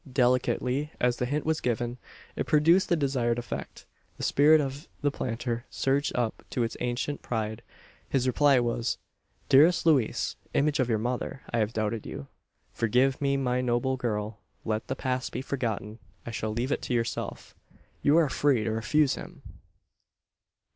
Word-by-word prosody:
Delicately 125 +2 +1
as 125 -1 +2
the 125 - -1
hint 145 +3 -1
was 160 0 0
given, 120 0 -1 0.4
it - - -2
produced 165 +5 +4
the 170 - +4
desired 130 -6 0
effect. 120 - -6 0.3
The - - -6
spirit 155 +2 +5
of 140 +2 -4
the 145 -1 +2
planter 120 -2 -3
surged 140 +2 0
up 120 -3 -1
to 125 - 0
its 115 - -3
ancient 125 +4 -2
pride, 110 -2 -3 0.5
His 130 -2 +1
reply 135 +1 +4
was: 120 -1 -1 0.5
"Dearest 155 +6 +5
Louise! 140 -9 +2 0.2
image 150 +1 +2
of 130 -2 +1
your 110 - +2
mother! 125 +4 -3
I 120 - +1
had 110 +1 0
doubted 110 0 -2
you. 70 - -6 0.5
Forgive 125 +5 +2
me, 140 -1 +2
my 125 -2 0
noble 125 +2 +1
girl! 110 -3 -3 0.3
Let 110 0 -2
the 130 - -2
past 130 -1 -2
be 130 - -4
forgotten. 115 -5 -3 0.3
I 115 - -5
shall 110 -1 -3
leave 120 +5 -2
it - - 0
to 125 - -2
yourself. 115 -1 -3 0.5
You 145 +3 +4
are 165 -2 +5
free 135 -4 +2
to 110 - -1
refuse 130 +6 +2
him!" - - -9
125 Hz, 165 wpm, -28 LUFS, 115-140 Hz, 0.5 s, spirit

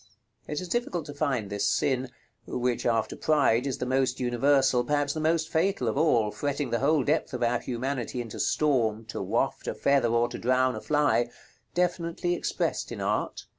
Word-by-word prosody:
It 150 - -3
is 185 - -6
difficult 180 -7 -2
to 145 - -7
find 135 -9 -1
this 105 +1 +1
sin, 130 +1 0 0.4
which, 125 -1 -1
after 115 -2 0
Pride, 140 -5 +2
is 135 - -2
the - - -3
most 130 0 0
universal, 125 +1 +3
perhaps 145 +1 0
the 155 - -4
most 160 +1 +1
fatal, 160 -5 0
of 110 - 0
all, 120 -8 +3
fretting 145 -1 -2
the 120 - +1
whole 145 +1 +3
depth 150 -2 0
of 125 - -2
our 120 0 +2
humanity 125 0 -3
into 115 -3 -6
storm 115 -7 +1
"to - - -4
waft - - -1
a - - -2
feather 140 -3 +2
or 120 +1 +2
to 120 - -7
drown 130 +1 +2
a - - -6
fly," 145 -5 +2 0.5
definitely 175 -1 0
expressed 175 - -2
in - - -5
art. - - -2
135 Hz, 185 wpm, -27 LUFS, 120-150 Hz, 0.5 s, universal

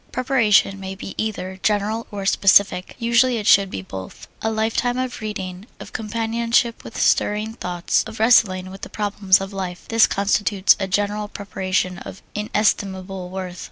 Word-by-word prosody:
Preparation 230 -6 +2
may 190 0 -6
be 195 - -8
either 190 -3 -3
general 215 +2 0
or 200 -2 -6
specific; 195 -1 +3
usually 235 +1 +3
it 210 - -4
should 200 -1 +5
be 95 - -6
both. 95 0 -9
A 220 - 0
life 220 0 -1
time 245 0 0
of 255 -2 -3
reading, 190 -2 -6
of - - -11
companionship 230 +2 0
with - - -8
stirring 210 +2 +1
thoughts, 180 -5 -1
of 220 - -9
wrestling 185 -5 +3
with 195 - -11
the - - -7
problems 200 -2 +2
of 195 +1 -6
life 185 -2 -5
this 225 0 +5
constitutes 200 0 +2
a 195 - -1
general 205 +2 -1
preparation 185 -3 -2
of 195 - -10
inestimable 195 -3 -1
worth. 185 -1 -6
205 Hz, 160 wpm, -21 LUFS, 190-220 Hz, -, should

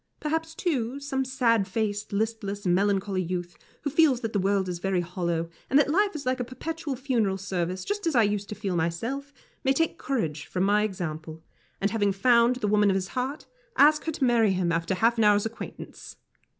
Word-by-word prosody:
Perhaps, 320 +1 -2
too, 275 -7 -1
some 275 -1 -2
sad 235 -6 +2
faced, 205 +1 -2
listless, 205 -1 -2
melancholy 195 +1 +1
youth, 175 0 -4 0.3
who 290 - -1
feels 290 -5 +4
that 225 -1 -3
the 205 - +1
world 195 0 +1
is 175 -1 -4
very 190 -1 0
hollow, 170 -1 -2 0.2
and 270 - +4
that 290 0 +4
life 405 +3 +2
is 285 - -5
like 255 0 0
a - - 0
perpetual 290 +3 -5
funeral 235 -7 0
service, 185 -1 -3
just 410 -2 -2
as 320 - 0
I 230 - +6
used 205 -1 -1
to 210 - -5
feel 195 -3 -3
myself, 225 +13 -2 0.3
may 270 - +3
take 325 +4 0
courage 160 - -2
from 180 - -1
my 205 +2 +3
example, 160 -5 -4 0.4
and 200 +1 0
having 205 -3 +1
found 235 +4 +4
the 240 -4 -2
woman 205 0 +4
of 190 - +2
his 190 -1 -2
heart, 265 +4 -3 0.3
ask 300 +1 +5
her 325 - 0
to 285 - -3
marry 230 -5 +4
him 180 -2 0
after 165 +3 0
half 230 +4 +2
an - - +4
hour's 205 0 +4
acquaintance. 225 +1 -8
210 Hz, 205 wpm, -27 LUFS, 190-265 Hz, 0.4 s, I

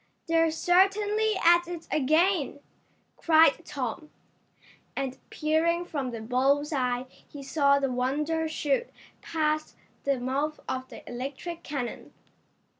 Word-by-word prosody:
"They're 330 -1 +3
certainly 400 +6 +2
at 345 +1 +6
it 345 -2 -7
again!" 310 +2 +2 0.6
cried 320 0 +5
Tom, 285 0 -5 0.9
and 265 -1 -3
peering 330 +3 +1
from 280 -7 -3
the 230 -2 -6
bull's 275 +6 +1
eye 250 -2 0
he 285 -1 -13
saw 280 0 +3
the 275 -2 0
Wonder 300 +6 0
shoot 310 - -1 0.3
past 310 -1 -1 0.3
the 275 -2 +1
mouth 280 +5 -2
of 260 0 -3
the - - -12
electric 275 +7 -6
cannon. 270 -7 -5
300 Hz, 115 wpm, -27 LUFS, 270-330 Hz, 0.9 s, at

